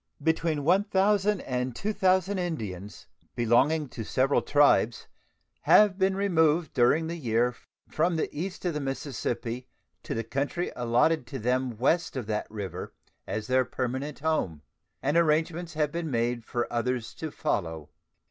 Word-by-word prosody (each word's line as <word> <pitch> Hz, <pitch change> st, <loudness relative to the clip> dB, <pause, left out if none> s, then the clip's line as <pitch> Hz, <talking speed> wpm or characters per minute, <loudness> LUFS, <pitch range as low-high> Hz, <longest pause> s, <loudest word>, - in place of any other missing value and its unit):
Between 160 Hz, -2 st, +1 dB
1,000 195 Hz, +3 st, +2 dB
and 125 Hz, -1 st, -3 dB
2,000 190 Hz, -, +1 dB
Indians, 105 Hz, -, -5 dB, 0.3 s
belonging 135 Hz, +7 st, +3 dB
to 115 Hz, -, -6 dB
several 130 Hz, +5 st, +2 dB
tribes, 145 Hz, -5 st, +3 dB, 0.6 s
have 205 Hz, -2 st, +5 dB
been 190 Hz, 0 st, +2 dB
removed 165 Hz, -5 st, +2 dB
during 125 Hz, +7 st, +3 dB
the 165 Hz, +1 st, -4 dB
year 120 Hz, -2 st, +1 dB, 0.3 s
from 170 Hz, +2 st, +1 dB
the 160 Hz, -, 0 dB
east 180 Hz, +5 st, -5 dB
of 175 Hz, -, 0 dB
the 150 Hz, -, -2 dB
Mississippi 125 Hz, -3 st, -4 dB, 0.3 s
to -, -, -5 dB
the 115 Hz, -, -2 dB
country 140 Hz, +9 st, -2 dB
allotted 125 Hz, +4 st, +2 dB
to 135 Hz, -, -5 dB
them 125 Hz, 0 st, -1 dB
west 150 Hz, +5 st, +1 dB
of 125 Hz, -, -3 dB
that 105 Hz, 0 st, -3 dB
river 95 Hz, -4 st, -6 dB, 0.3 s
as 105 Hz, 0 st, -3 dB
their 130 Hz, +2 st, +3 dB
permanent 130 Hz, +4 st, -3 dB
home, 95 Hz, -, -1 dB, 0.4 s
and 145 Hz, +4 st, +2 dB
arrangements 165 Hz, +1 st, +1 dB
have 150 Hz, -1 st, +1 dB
been 170 Hz, 0 st, -3 dB
made 120 Hz, -1 st, -1 dB
for 120 Hz, -1 st, -1 dB
others 120 Hz, -1 st, -1 dB
to 160 Hz, -, -5 dB
follow. 80 Hz, -, -3 dB
140 Hz, 145 wpm, -28 LUFS, 120-165 Hz, 0.6 s, have